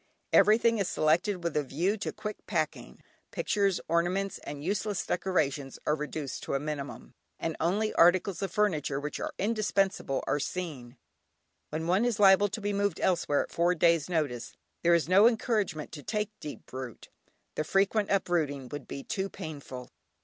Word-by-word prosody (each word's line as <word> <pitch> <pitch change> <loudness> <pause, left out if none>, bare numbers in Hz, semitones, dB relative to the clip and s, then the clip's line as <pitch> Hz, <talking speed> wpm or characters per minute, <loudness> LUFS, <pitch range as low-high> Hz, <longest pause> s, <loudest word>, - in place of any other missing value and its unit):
Everything 230 +1 +5
is 195 - +1
selected 175 +2 +1
with 170 -2 -2
a 150 - +3
view 165 +9 0
to 210 - -4
quick 210 -1 -6
packing; 155 -5 -3 0.3
pictures, 200 -3 +1
ornaments, 175 +4 0
and 145 0 -7
useless 205 +2 -1
decorations 145 -8 -1
are 150 - +2
reduced 150 -2 -5
to - - -3
a - - +1
minimum, 145 -1 -6 0.3
and 165 - -2
only 205 +6 +1
articles 180 +2 +4
of 195 - -1
furniture 160 -10 +1
which 150 +1 -4
are - - -4
indispensable 195 -8 0
are 145 - 0
seen. 140 -7 -5 0.7
When 160 +1 -3
one 185 +6 +3
is 240 -3 0
liable 195 0 +7
to 215 +3 -5
be 205 0 -1
moved 200 -3 0
elsewhere 170 -6 +2
at - - -12
four 175 +2 +2
days' 165 -2 +3
notice, 150 -8 -1 0.3
there 170 0 +5
is 160 -4 +1
no 195 +5 +7
encouragement 220 - 0
to 150 - -8
take 210 +5 -2
deep 150 - -9
root, 130 -2 -7 0.4
the 155 - -1
frequent 195 +5 +2
uprooting 155 -9 0
would 145 - -7
be 140 - -6
too 195 -1 -2
painful. 140 -9 -8
175 Hz, 165 wpm, -29 LUFS, 150-200 Hz, 0.7 s, liable